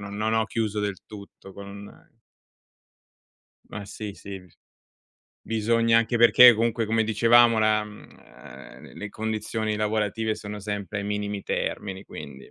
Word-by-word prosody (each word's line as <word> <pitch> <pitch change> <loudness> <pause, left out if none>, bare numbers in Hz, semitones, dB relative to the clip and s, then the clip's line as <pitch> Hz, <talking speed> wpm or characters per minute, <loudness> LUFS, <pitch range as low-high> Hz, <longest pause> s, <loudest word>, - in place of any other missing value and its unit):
Non 100 +2 -3
ho 110 0 +2
chiuso 110 -1 -2
del 100 -2 -2
tutto 100 -2 -12
con 100 +1 -10 1.8
Ma 105 0 -7
sì 105 +1 -7
sì, 100 -1 -9
bis 90 -1 -22 0.9
bisogna 115 +1 +2
anche 115 +1 0
perché 120 +1 +8
comunque 115 0 0
come 115 +1 +1
dicevamo, 115 +1 +4
la 110 0 +3
ehm, 85 -10 -14
le 105 - -7
condizioni 110 0 -3
lavorative 110 +1 -1
sono 105 0 -8
sempre 100 -1 -4
ai 100 - -4
minimi 105 -1 -3
termini 95 -1 -4
quindi. 65 -2 -11
105 Hz, 130 wpm, -25 LUFS, 100-110 Hz, 1.8 s, perché